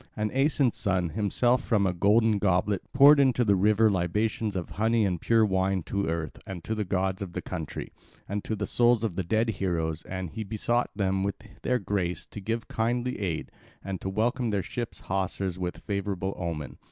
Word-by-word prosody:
And 105 -1 -1
Aeson's 135 -2 +2
son 95 -4 0
himself 115 +6 +1
from 105 -4 +2
a 90 - +1
golden 105 +3 +3
goblet 95 0 +1
poured 140 +2 +8
into 130 -3 +3
the 100 -2 +4
river 105 +3 +4
libations 105 +4 0
of 90 -2 -4
honey 110 +1 +2
and 90 -4 -1
pure 115 -1 +4
wine 95 -2 +1
to 100 +3 -2
Earth 80 -1 -3
and 95 -4 -6
to 110 - -2
the 110 -1 -1
gods 95 0 -1
of 95 -3 -5
the - - -3
country, 80 -5 -5 0.4
and 100 +1 -3
to 110 - -2
the 105 0 -2
souls 120 +1 +3
of 110 -5 0
dead 110 +4 +2
heroes; 85 -6 -1
and 95 -3 -5
he 110 - -4
besought 115 +3 0
them 95 -1 0
of 100 - -2 0.3
their 125 - +1
grace 95 -5 -2
to - - -9
give 115 +3 -3
kindly 120 +2 -1
aid, 90 -6 -3 0.3
and 95 -2 -4
to 95 - -3
welcome 120 +4 0
their 100 -3 0
ship's 120 +5 -5
hawsers 95 -1 -2
with 90 -1 -4
favourable 100 -2 -2
omen. 80 -4 -5
100 Hz, 190 wpm, -27 LUFS, 95-115 Hz, 0.4 s, poured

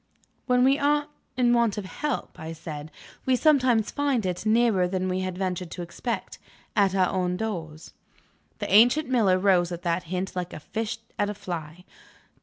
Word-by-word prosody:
"When 250 -1 +4
we 270 +2 +4
are 295 +1 +2 0.3
in 240 -1 +4
want 235 -4 +2
of 205 - -4
help," 295 +8 -4
I 160 +1 -6
said, 155 -1 -7 0.4
"we 260 - +4
sometimes 250 -6 +3
find 280 -7 0
it, 180 +3 -2
nearer 220 -5 +3
than 185 0 -2
we 185 0 -1
had 185 -1 -3
ventured 180 -2 -2
to 175 - -6
expect 230 +7 -5 0.4
at 195 -2 +3
our 185 -2 +3
own 180 -1 -1
doors." 165 -7 -5 0.6
The - - -3
ancient 245 +8 +6
miller 215 -8 +3
rose 185 -2 +3
at 175 0 -6
that 175 +1 -1
hint 185 +3 -3
like 180 -1 -4
a - - -6
fish 220 +8 -4 0.2
at 205 - +1
a 210 - -4
fly. 170 -1 -7
190 Hz, 180 wpm, -26 LUFS, 180-240 Hz, 0.6 s, ancient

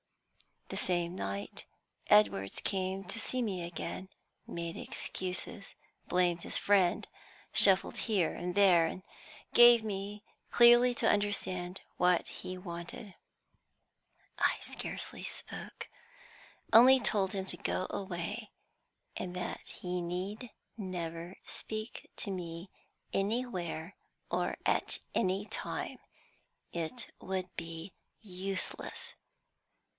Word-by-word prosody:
The - - -4
same 175 -1 0
night 100 - -4 0.4
Edwards 100 -2 +4
came 190 0 -1
to 195 +4 -2
see 255 +2 0
me 190 -5 -2
again, 170 +2 -5 0.4
made 170 0 -4
excuses, 185 +2 -3 0.3
blamed 175 -1 +2
his - - 0
friend, 190 -4 +3 0.5
shuffled 195 -1 +5
here 200 -8 +1
and 180 0 -4
there, 180 -5 +6
and 185 +3 -6 0.5
gave 240 -1 +9
me 205 0 -4 0.3
clearly 240 +1 +7
to - - +2
understand 190 -3 0 0.2
what 180 -1 +3
he 185 0 -6
wanted. 175 +3 -7 1.3
I - - +4
scarcely - - -4
spoke, - - -6 0.9
only 255 +4 +9
told 205 -4 +1
him 190 -1 -2
to - - -3
go 185 - -1
away, 200 +4 -4 0.7
and 180 -1 -4
that 180 - -4
he 180 0 -4
need 190 +7 -4 0.3
never 175 -3 -4
speak 215 +1 -5
to 200 - -2
me 175 0 -5 0.4
anywhere 195 -5 -2 0.3
or - - 0
at - - +2 0.2
any 190 +2 +1
time; 220 - -4 0.7
it 170 +8 -4
would 185 -1 -4
be 165 +2 -6 0.3
useless. 190 -2 -4
185 Hz, 105 wpm, -33 LUFS, 175-205 Hz, 1.3 s, gave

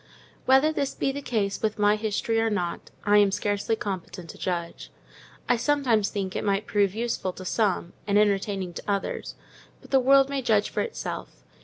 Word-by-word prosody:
Whether 270 +4 +5
this 280 -3 -2
be 270 - 0
the 285 +1 -5
case 210 -7 -1
with 215 -1 -1
my 210 0 +4
history 220 +1 -1
or 225 - +2
not, 180 -5 -3
I 210 0 +5
am 205 -1 +5
hardly 205 +2 0
competent 185 -5 -6
to - - -15
judge. 170 -2 -4 0.6
I 245 - +3
sometimes 235 -6 +2
think 190 -2 -4
it - - -2
might 200 +1 0
prove 205 -2 +1
useful 230 -5 -2
to 185 - -9
some, 185 -3 0
and 205 0 +3
entertaining 195 -3 +1
to - - -7
others; 200 -1 -2 0.4
but - - -18
the 270 - +5
world 270 +1 +5
may 275 -1 -2
judge 215 -4 +2
for - - -1
itself. 470 - -6
210 Hz, 185 wpm, -26 LUFS, 195-240 Hz, 0.6 s, Whether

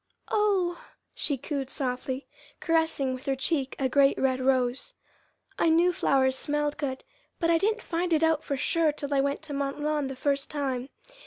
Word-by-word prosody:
"Oh!" 385 -5 +1 0.3
she 285 - -1
cooed 275 0 -4
softly, 260 0 -2 0.3
caressing 320 -5 +1
with 255 +1 -8
her 270 - +2
cheek 270 -1 -1
a 270 - +1
great 275 +1 +4
red 260 -1 +1
rose. 255 -1 0 0.6
"I 335 - +4
knew 345 +2 +4
flowers 270 -7 +2
smelled 295 +1 -1
good, 265 -3 -3 0.4
but 335 0 +2
I 330 - +4
didn't 440 +4 0
find 345 +1 -2
it 320 -1 +3
out 320 -1 +2
for 280 - -2
sure 320 +2 +2
till 290 -1 -4
I 275 - +3
went 280 +2 -1
to 310 -2 -5
Mont 275 0 -2
Lawn 300 -1 0
that 270 - -5
first 275 +1 0
time. 270 -3 -2
285 Hz, 180 wpm, -27 LUFS, 265-320 Hz, 0.6 s, great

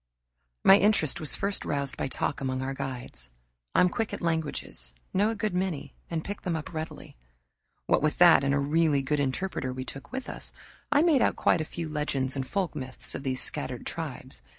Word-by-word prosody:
My 195 - +9
interest 175 -7 +3
was 155 -3 -1
first 200 0 -1
roused 140 -2 -1
by - - -2
talk 140 - -2
among 130 -1 -1
our 135 +1 -2
guides. 130 - -6 0.5
I'm 180 - +6
quick 220 +4 -2
at - - -8
languages, 160 - -1 0.2
know 205 +3 +3
a 225 - -1
good 210 -2 -1
many, 180 -4 -2 0.2
and 165 -2 -2
pick 205 0 -5
them 175 -2 -1
up 160 +2 -5
readily. 160 0 -6 0.7
What - - +3
with 155 0 +1
that 175 -5 +7
and 140 - +2
a - - +3
really 145 0 +2
good 145 +2 0
interpreter 140 0 -1
we 130 0 -5
took 135 - -9
with 260 0 -4
us, - - -7 0.4
I 290 +1 +5
made 315 -7 +4
out - - +3
quite 170 - +3
a - - -2
few 165 +1 -5
legends 145 -3 -1
and 135 -1 -2
folk 190 -2 -1
myths 130 -1 -2
of - - -4
these 130 -2 -1
scattered - - -3
tribes. - - -5
155 Hz, 200 wpm, -28 LUFS, 135-185 Hz, 0.7 s, My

